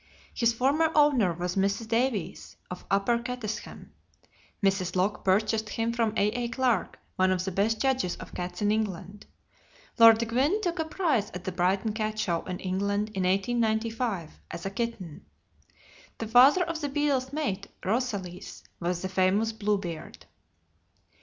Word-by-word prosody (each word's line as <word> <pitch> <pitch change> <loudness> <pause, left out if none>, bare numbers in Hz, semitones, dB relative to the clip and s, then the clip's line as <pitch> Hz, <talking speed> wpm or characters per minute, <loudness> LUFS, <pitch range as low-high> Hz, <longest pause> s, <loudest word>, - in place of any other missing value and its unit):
His 235 -1 +2
former 280 +7 +2
owner 280 - +4
was 180 +1 -3
Mrs. 200 +3 0
Davies, 225 -6 -1 0.2
of 180 - -7
Upper 200 +4 +2
Cattesham. 235 -3 -6 0.7
Mrs. 190 -2 +1
Locke 190 +3 0
purchased 215 +3 +1
him 230 +2 -1
from 230 -2 +1
A.A. 235 +4 +1
Clarke, 235 -4 0 0.2
one 185 0 +3
of 185 -1 0
the 190 - -2
best 215 +4 +1
judges 260 -9 +1
of - - -11
cats 180 +2 -5
in 205 - +3
England. 205 -2 -3 0.7
Lord 230 0 +7
Gwynne 270 - +1
took 350 -3 -2
a 320 - 0
prize 310 - 0
at 180 - -6
the 185 - -3
Brighton 190 +4 0
Cat 215 0 -2
Show 175 -6 0
in 180 -1 -5
England 200 +3 -1
in 190 -3 -2
1895, 220 -1 -1
as 170 - -7
a 195 - -2
kitten. 210 -8 -5 0.9
The 225 - -4
father 260 +10 +6
of 335 -2 -4
The 290 - -2
Beadle's 275 -2 0
mate, 235 -10 -2 0.2
Rosalys, 200 -5 -3 0.2
was 175 +1 -2
the - - -1
famous 190 +4 +2
"Bluebeard." 200 -6 -3
215 Hz, 150 wpm, -28 LUFS, 190-240 Hz, 0.9 s, Lord